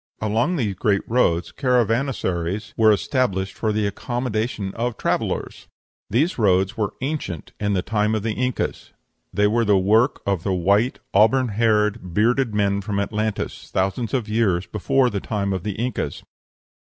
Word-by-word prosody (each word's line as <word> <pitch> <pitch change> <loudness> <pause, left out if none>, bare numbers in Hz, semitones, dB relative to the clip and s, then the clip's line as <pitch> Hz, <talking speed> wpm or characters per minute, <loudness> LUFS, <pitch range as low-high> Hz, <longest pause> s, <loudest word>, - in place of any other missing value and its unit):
Along 110 - +1
these 110 - -1
great 100 +1 0
roads 90 -8 +1
caravansaries 115 - 0
were 110 -1 +5
established 100 -4 0
for 110 - -1
the 105 0 0
accommodation 110 -1 -2
of 120 0 -2
travellers. - - -2 0.4
These 140 - +1
roads 95 -2 +2
were 105 -2 -2
ancient 135 - -4
in 105 -1 0
the 90 -2 0
time 105 0 0
of 105 - -2
the 110 -1 -1
Incas. 125 +2 -3 0.4
They 105 - +2
were 115 +3 +2
the 105 -2 +4
work 110 +8 +2
of 100 -4 0
the 95 +2 -1
white, 100 +7 +2 0.2
auburn 120 +5 +4
haired, 105 -4 +1
bearded 120 +3 +2
men 100 -1 +1
from 100 0 -2
Atlantis, 105 +1 -3
thousands 95 +7 -1
of 120 -4 -1
years 105 -5 +1
before 125 +6 +1
the 100 - -2
time 100 -2 -2
of 95 - -2
the 105 +2 -3
Incas. 115 - -3
105 Hz, 155 wpm, -22 LUFS, 100-120 Hz, 0.4 s, were